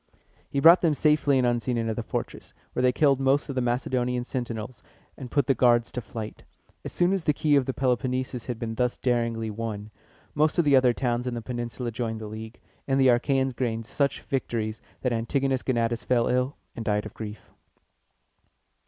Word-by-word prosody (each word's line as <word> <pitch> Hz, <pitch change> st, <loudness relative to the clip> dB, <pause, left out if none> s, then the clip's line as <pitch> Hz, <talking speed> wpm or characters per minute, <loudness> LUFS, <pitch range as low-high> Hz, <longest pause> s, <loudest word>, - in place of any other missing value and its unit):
He 140 Hz, -, -1 dB
brought 165 Hz, +5 st, +8 dB
them 160 Hz, -4 st, +2 dB
safely 150 Hz, -2 st, +3 dB
and 130 Hz, -, +2 dB
unseen 120 Hz, 0 st, 0 dB
into 115 Hz, -1 st, -1 dB
the 120 Hz, -, -3 dB
fortress, 115 Hz, -, -5 dB, 0.2 s
where -, -, -1 dB
they 125 Hz, 0 st, +4 dB
killed 140 Hz, 0 st, +3 dB
most 135 Hz, +2 st, +2 dB
of -, -, -2 dB
the 130 Hz, -, 0 dB
Macedonian 125 Hz, 0 st, -1 dB
sentinels, 120 Hz, -2 st, -5 dB, 0.3 s
and 130 Hz, -3 st, -8 dB
put 140 Hz, 0 st, +1 dB
the 135 Hz, -, +3 dB
guards 120 Hz, -2 st, +3 dB
to 125 Hz, -, -4 dB
flight. 110 Hz, -1 st, -7 dB, 0.4 s
As -, -, -6 dB
soon 175 Hz, +2 st, +2 dB
as 195 Hz, -3 st, -1 dB
the 150 Hz, -, +3 dB
key 150 Hz, 0 st, +2 dB
of 140 Hz, -2 st, +2 dB
the 130 Hz, -, -1 dB
Peloponnesus 130 Hz, -1 st, -1 dB
had 125 Hz, -3 st, -3 dB
been 115 Hz, -1 st, -4 dB
thus 125 Hz, +1 st, 0 dB
daringly 115 Hz, -3 st, 0 dB
won, 105 Hz, -1 st, -5 dB, 0.4 s
most 155 Hz, +1 st, +2 dB
of 170 Hz, -, +3 dB
the 145 Hz, -1 st, +5 dB
other 130 Hz, -2 st, +5 dB
towns 125 Hz, -1 st, -1 dB
in 125 Hz, -, -2 dB
the 120 Hz, -, -4 dB
peninsula 120 Hz, 0 st, -4 dB
joined 110 Hz, -1 st, -3 dB
the 110 Hz, -, -6 dB
league, 110 Hz, +2 st, -8 dB, 0.3 s
and 135 Hz, 0 st, +2 dB
the 130 Hz, -1 st, +5 dB
Achæans 130 Hz, +1 st, +2 dB
gained 115 Hz, -3 st, -2 dB
such 140 Hz, +4 st, -1 dB
victories, 115 Hz, -5 st, -3 dB, 0.2 s
that 125 Hz, -2 st, +1 dB
Antigonus 130 Hz, +3 st, 0 dB
Gonatus 115 Hz, -2 st, 0 dB
fell 120 Hz, -2 st, +2 dB
ill, 125 Hz, +3 st, 0 dB, 0.2 s
and 115 Hz, -, -5 dB
died 105 Hz, -1 st, 0 dB
of 110 Hz, -, -8 dB
grief. 105 Hz, -1 st, -8 dB
125 Hz, 195 wpm, -26 LUFS, 115-135 Hz, 0.4 s, brought